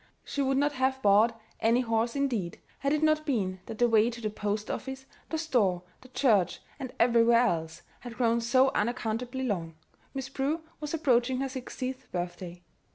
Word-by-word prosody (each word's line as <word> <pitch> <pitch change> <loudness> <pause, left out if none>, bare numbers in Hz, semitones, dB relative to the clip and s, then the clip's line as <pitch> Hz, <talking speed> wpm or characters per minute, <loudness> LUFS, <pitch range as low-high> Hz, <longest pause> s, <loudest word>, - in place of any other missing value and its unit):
She 285 - -3
would 270 0 +1
not 290 +1 +2
have 265 -1 0
bought 215 +3 +4 0.2
any 230 +3 +3
horse, 230 0 0
indeed, 240 -11 -1 0.2
had 275 - 0
it 305 +1 +1
not 310 0 +3
been 200 -11 -1
that 220 - -6
the 240 - +4
way 225 0 +4
to 235 0 -7
the 215 -2 -3
post 210 0 -2
office, 265 0 -5 0.2
the 320 - -1
store, 215 - +1 0.2
the 255 - -14
church, 225 -8 +2 0.2
and 260 -2 -5
everywhere 235 0 +5
else, 160 -6 -2 0.2
had 240 -2 -9
grown 235 -1 +2
so 255 +3 +4
unaccountably 240 +3 -2
long 170 -8 -2 0.4
Miss 270 -1 -3
Prue 275 +4 -1 0.2
was 300 +1 -3
approaching 255 -4 +2
her 270 - -1
sixtieth 260 0 -6
birthday. 175 0 -5
240 Hz, 175 wpm, -29 LUFS, 215-265 Hz, 0.4 s, everywhere